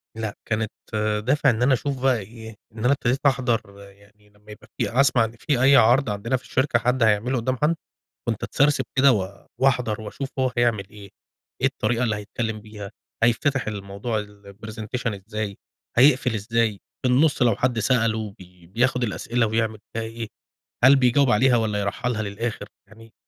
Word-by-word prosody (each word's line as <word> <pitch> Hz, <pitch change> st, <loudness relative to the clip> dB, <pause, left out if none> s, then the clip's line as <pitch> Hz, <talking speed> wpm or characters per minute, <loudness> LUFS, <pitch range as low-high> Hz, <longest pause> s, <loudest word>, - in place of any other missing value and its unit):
لأ، 110 Hz, -2 st, -4 dB
كانت 110 Hz, -1 st, -1 dB, 0.5 s
دافع 145 Hz, +4 st, +3 dB
إن 115 Hz, 0 st, 0 dB
أنا 130 Hz, +2 st, +4 dB
أشوف 135 Hz, +1 st, -2 dB
بقى 130 Hz, -3 st, +3 dB
إيه، 110 Hz, +2 st, -10 dB, 0.2 s
إن 110 Hz, -1 st, -7 dB
أنا 130 Hz, -, +5 dB
ابتديت 130 Hz, -1 st, 0 dB
أحضر 125 Hz, -4 st, +2 dB, 0.3 s
يعني 100 Hz, +1 st, -24 dB
لمّا 105 Hz, +1 st, -17 dB
يبقى 105 Hz, -, -13 dB
في -, -, 0 dB
أسمع 130 Hz, -4 st, +3 dB
إن 110 Hz, -, -6 dB
في 140 Hz, -5 st, 0 dB
أي 140 Hz, +1 st, +7 dB
عرض 125 Hz, +1 st, +5 dB
عندنا 105 Hz, +5 st, -1 dB
في 125 Hz, -, -16 dB
الشركة 130 Hz, -2 st, +1 dB
حد 125 Hz, +2 st, +1 dB
هيعملُه 110 Hz, +4 st, +2 dB
قُدّام 130 Hz, +2 st, -1 dB
حد، 150 Hz, +6 st, +2 dB, 0.5 s
كنت 110 Hz, -3 st, -2 dB
أتسرسب 145 Hz, +1 st, +2 dB
كده 135 Hz, 0 st, +6 dB
و 100 Hz, -2 st, -4 dB
واحضر 125 Hz, -5 st, +1 dB
وأشوف 110 Hz, +6 st, -6 dB
هو 130 Hz, -1 st, +2 dB
حيعمل 120 Hz, -6 st, 0 dB
إيه، 100 Hz, -2 st, -12 dB, 0.5 s
إيه 130 Hz, -, +3 dB
الطريقة 125 Hz, -2 st, 0 dB
اللي 110 Hz, -3 st, 0 dB
هيتكلم 110 Hz, +1 st, -4 dB
بيها، 105 Hz, -2 st, -9 dB, 0.3 s
هيتفتح 125 Hz, +4 st, +2 dB
الموضوع 105 Hz, +2 st, -3 dB
الPresentation 105 Hz, +2 st, -6 dB
إزاي، 105 Hz, -2 st, -4 dB, 0.4 s
هيقفل 125 Hz, -1 st, +4 dB
إزاي؟ 110 Hz, -1 st, 0 dB, 0.2 s
في 130 Hz, -, +1 dB
النُصّ 140 Hz, +2 st, +3 dB
لو 115 Hz, -4 st, +3 dB
حد 125 Hz, -2 st, 0 dB
سأله 110 Hz, -2 st, 0 dB
بي 90 Hz, -1 st, -16 dB
بياخد 120 Hz, +7 st, 0 dB
الأسئلة 115 Hz, +2 st, -1 dB
ويعمل 110 Hz, 0 st, -1 dB, 0.2 s
بيها 115 Hz, -, -2 dB
إيه، 115 Hz, 0 st, -6 dB, 0.6 s
هل 135 Hz, +2 st, +8 dB
بيجاوب 135 Hz, +1 st, +3 dB
عليها 125 Hz, +2 st, +4 dB
والَّا 110 Hz, -2 st, 0 dB
يرحّلها 110 Hz, +3 st, -2 dB
للآخر؟ 105 Hz, +1 st, -4 dB, 0.2 s
يعني 115 Hz, 0 st, -17 dB
115 Hz, 170 wpm, -23 LUFS, 105-125 Hz, 0.6 s, هل